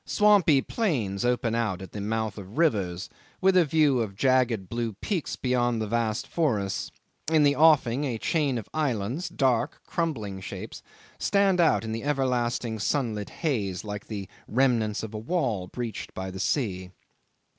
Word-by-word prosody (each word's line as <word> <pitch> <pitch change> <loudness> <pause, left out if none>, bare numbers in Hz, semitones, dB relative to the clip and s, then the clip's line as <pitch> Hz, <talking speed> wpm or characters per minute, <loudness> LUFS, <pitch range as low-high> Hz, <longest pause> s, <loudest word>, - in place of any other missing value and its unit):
Swampy 200 -10 +4
plains 120 - -1
open 120 -2 +1
out 110 -6 0
at 95 -2 -9
the 105 - -5
mouth 110 0 -2
of 100 +5 -10
rivers, 100 - +1 0.3
with 190 0 +4
a 180 - +7
view 150 -4 +3
of 105 -4 -2
jagged 125 -4 +2
blue 115 0 -2
peaks 170 - -3
beyond 120 -2 +1
the 110 - -1
vast 110 0 -1
forests. 110 - -1 0.4
In 155 -2 +5
the 145 0 +4
offing 145 -4 +4
a 125 -5 -1
chain 140 0 0
of 110 - -6
islands, 140 - -1
dark, 130 -8 +1
crumbling 110 - -3
shapes, - - -7 0.4
stand 200 -2 +3
out 165 - +3
in 110 - -4
the 115 +1 -4
everlasting 125 -5 0
sunlit 110 -4 -1
haze 105 - -2
like 105 -1 -6
the 100 -3 -5 0.2
remnants 115 -4 +1
of 110 0 -6
a 105 - -4
wall 115 - -1
breached 120 +1 -6
by 95 0 -4
the 95 - -7
sea. 95 -5 -1
120 Hz, 160 wpm, -27 LUFS, 105-145 Hz, 0.4 s, a